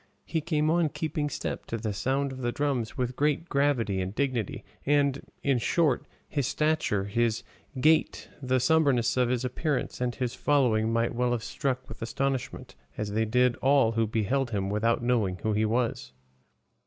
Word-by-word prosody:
He 160 -1 -1
came 155 -1 +1
on 170 -2 +2
keeping 155 -1 -2
step - - -4
to 115 - -3
the 110 -2 -3
sound 135 +8 0
of 130 - -8
the 120 -1 0
drums 135 -5 -2
with 125 0 -1
great 150 +4 +1
gravity 130 -9 +1
and 95 +2 -4
dignity; 130 -7 -2 0.2
and, 140 -1 +2 0.2
in 135 -3 +2
short, 150 +1 +1 0.2
his 140 -5 -1
stature, 150 -10 +1
his 115 +3 0 0.4
gait, 155 +4 +2
the 130 -1 +1
sombreness 130 -4 +3
of 125 -1 +2
his 125 0 0
appearance 130 +1 -2
and 125 -1 -1
his 125 -2 -2
following 115 -6 +2
might 115 0 +1
well 120 0 +1
have 115 -2 -2
struck 130 -1 -2
with 110 - -10
astonishment, 135 +3 -3 0.2
as 105 -1 -3
they 110 +2 +1
did, 125 +2 +3
all 135 -4 +4
who 115 -1 +1
beheld 115 +5 0
him 100 -3 -2
without 115 +3 +1
knowing 110 -7 +1
who 110 - +1
he 110 +1 +2
was. 110 - -1
125 Hz, 175 wpm, -28 LUFS, 115-140 Hz, 0.4 s, all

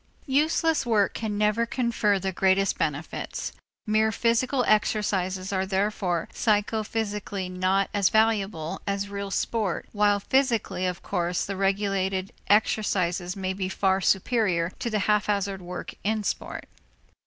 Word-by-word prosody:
Useless 315 +3 +2
work 220 -5 +2
can 215 -2 -3
never 210 +2 +2
confer 235 -5 +1
the 190 0 -2
greatest 190 +1 +2
benefits; 150 +1 -3 0.3
mere 220 0 +2
physical 240 +4 +1
exercises 195 -3 +1
are 190 0 +1
therefore 190 -2 -1
psychophysically 210 -3 -1
not 185 +2 +1
as 200 -3 +3
valuable 205 -7 +1
as 200 0 -1
real 200 0 -4
sport 205 -2 -1
while 205 -1 +3
physically, 230 -6 +1
of 180 -1 -4
course, 175 -2 -1
the 195 - -4
regulated 195 -1 0 0.2
exercises 185 -4 +1
may 190 -1 -2
be 190 -1 -3
far 190 0 +1
superior 190 -4 +1
to 235 - -2
the 215 - 0
haphazard 200 -2 +1
work 180 0 -6
in 215 +1 0
sport. - - -4
200 Hz, 130 wpm, -26 LUFS, 190-215 Hz, 0.3 s, as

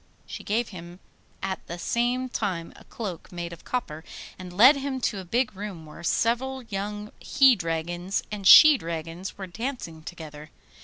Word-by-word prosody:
She - - -8
gave 225 +3 0
him 175 -1 -10 0.4
at 190 -1 -3
the 175 - -5
same 245 +6 0
time 190 -9 -3
a - - -16
cloak 195 -7 -7
made 175 -1 -5
of 170 - -13
copper, 160 -11 -4 0.4
and 180 -1 -8
led 245 +11 +7
him 275 -1 -3
to 205 - -1
a - - -6
big 240 +4 0
room 190 -5 -7
where 150 +2 -12
several 250 +8 0
young 210 0 -5
he 265 -2 +5
dragons 175 +1 -2
and 200 -2 -2
she 305 +3 +10
dragons 165 +2 -6
were 195 - -5
dancing 190 - -5
together. 155 -2 -9
195 Hz, 165 wpm, -26 LUFS, 170-240 Hz, 0.4 s, she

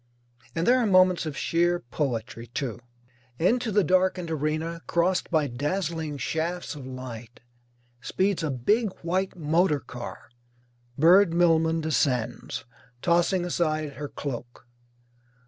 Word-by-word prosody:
And 165 +1 0
there 255 +1 +5
are 235 - +2
moments 185 -3 +4
of 150 - -5
sheer 175 +1 +1
poetry, 120 -3 -4
too. 120 -1 -4 0.6
Into 230 - +1
the 205 0 +3
darkened 185 -1 +1
arena, 160 +2 -2
crossed 180 +2 +1
by 155 -3 +2
dazzling 155 +3 -2
shafts 165 +5 -2
of 140 -4 -9
light, 125 -2 -8 0.6
speeds 190 +7 0
a 160 - -1
big 200 - +1
white 185 +3 -1
motor 160 0 +2
car. 120 -3 -9 0.7
Bird 170 +3 +6
Millman 165 -1 +3
descends, 125 -9 -1 0.4
tossing 175 +1 +2
aside 155 -4 -1
her 145 0 -6
cloak. 120 -3 -7
165 Hz, 120 wpm, -26 LUFS, 140-180 Hz, 0.7 s, Bird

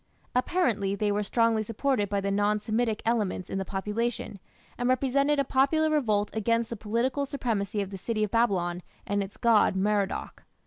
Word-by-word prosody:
Apparently 245 - +1
they 205 +1 0
were 205 +1 0
strongly 230 +1 +2
supported 225 0 -1
by 200 - 0
the 200 0 -1
non 205 +1 +2
Semitic 220 +1 -1
elements 210 -6 -1
in 195 - -1
the - - -1
population, 210 +2 -3 0.4
and 245 +1 -1
represented 275 +3 +2
a 280 - +3
popular 280 +4 +2
revolt 215 -9 +1
against 230 +1 0
the - - -2
political 235 +6 -1
supremacy 215 -7 -2
of 195 - -9
the 195 - -7
city 215 +2 -1
of 210 - -2
Babylon 185 -7 +1 0.2
and 205 0 0
its 195 +1 -7
god 230 -5 +4
Merodach. 200 0 -1
215 Hz, 175 wpm, -27 LUFS, 200-245 Hz, 0.4 s, god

